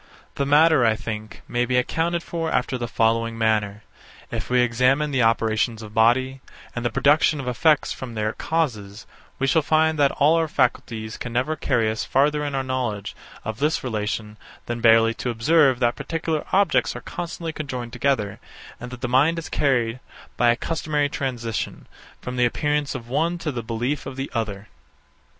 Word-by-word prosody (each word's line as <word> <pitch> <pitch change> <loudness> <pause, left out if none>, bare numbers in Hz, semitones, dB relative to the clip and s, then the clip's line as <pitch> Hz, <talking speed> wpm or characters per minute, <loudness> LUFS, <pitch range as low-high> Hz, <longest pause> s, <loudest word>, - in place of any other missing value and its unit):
The 140 - -2
matter, 150 -1 +5
I 110 -2 +3
think, 110 -2 -7
may 120 0 0
be 125 +1 +1
accounted 165 +6 0
for 165 -1 -3
after 125 +1 0
the 120 -1 -3
following 115 0 +1
manner. 105 -2 0 0.5
If - - -4
we 125 0 +3
examine 130 +5 +2
the 130 -2 +1
operations 115 0 +1
of 105 -1 -10
body, 130 +4 +2 0.3
and 120 - -3
the 120 - +1
production 150 +3 +3
of 135 - -5
effects 150 +4 +2
from 125 -3 -8
their 110 0 -1
causes, 110 -11 -2 0.3
we 135 - 0
shall 160 +4 +3
find 155 +1 +2
that 140 -1 +5
all 155 +4 +4
our 165 -1 +1
faculties 110 -5 -1
can 125 - -6
never 130 +6 0
carry 120 -6 +1
us 110 - -3
farther 150 +2 +2
in 145 -1 -3
our 135 - 0
knowledge 120 -6 -3 0.3
of 110 0 -4
this 150 +3 0
relation 110 -2 -3 0.3
than 120 0 -4
barely 115 0 +5
to 125 - -4
observe 135 +3 +3
that 120 -1 +2
particular 160 -1 -3
objects 200 +1 +2
are - - -6
constantly 170 -1 -5
conjoined 130 -6 -5
together, 125 -6 0 0.4
and 125 - -7
that 125 -1 -10
the - - -1
mind 140 +7 +3
is 165 - -5
carried, 125 -4 +1 0.4
by 120 - +3
a 120 - +4
customary 150 0 -1
transition, 120 -6 -4 0.3
from 125 0 -6
the 125 - +4
appearance 145 +3 -1
of 120 -3 -7
one 165 +7 0
to 160 -3 -3
the 120 -3 -4
belief 120 +5 -3
of 130 - -7
the 135 +1 -5
other. 105 -3 -3
125 Hz, 180 wpm, -23 LUFS, 115-150 Hz, 0.5 s, matter